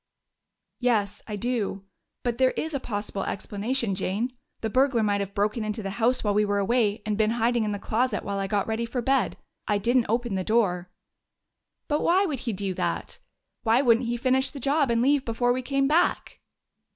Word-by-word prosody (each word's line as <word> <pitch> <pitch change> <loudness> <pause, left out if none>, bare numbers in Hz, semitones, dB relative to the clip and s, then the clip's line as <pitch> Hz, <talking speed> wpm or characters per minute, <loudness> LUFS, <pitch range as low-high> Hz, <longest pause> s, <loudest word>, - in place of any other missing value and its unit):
"Yes, 210 -5 +1
I 210 - -4
do. 205 -3 -2 0.4
But 240 -1 -2
there 260 -1 +3
is 320 0 -2
a 280 - 0
possible 205 -4 -4
explanation, 215 +3 -2
Jane. 205 +7 -2 0.3
The 220 - -1
burglar 255 -2 +3
might 205 -1 +1
have 200 0 -5
broken 215 +3 0
into 215 0 -3
the 195 - -3
house 250 +3 +3
while 205 -2 +1
we 210 +1 +3
were 205 -1 0
away 210 0 +1
and 210 0 -1
been 215 0 +3
hiding 235 0 +2
in 210 - -1
the 205 - -2
closet 225 +2 -1
while 200 0 -3
I 195 - -1
got 200 0 0
ready 225 +1 -2
for 245 +1 -3
bed. 270 +2 +1 0.3
I 210 - +2
didn't 240 +4 +2
open 235 -1 0
the 190 -1 -1
door." 185 -5 +1 1.0
"But 295 0 0
why 375 +4 +3
would 295 -8 -2
he 235 - -3
do 195 -1 -3
that? - - -3 0.4
Why 230 +4 +3
wouldn't 235 -1 +3
he 240 0 -1
finish 260 +2 +2
the 285 - -9
job 280 +1 +2
and 235 0 +2
leave 280 0 +3
before 245 +1 +1
we 255 - -2
came 275 +1 +1
back?" 330 +5 +1
230 Hz, 200 wpm, -26 LUFS, 205-255 Hz, 1.0 s, there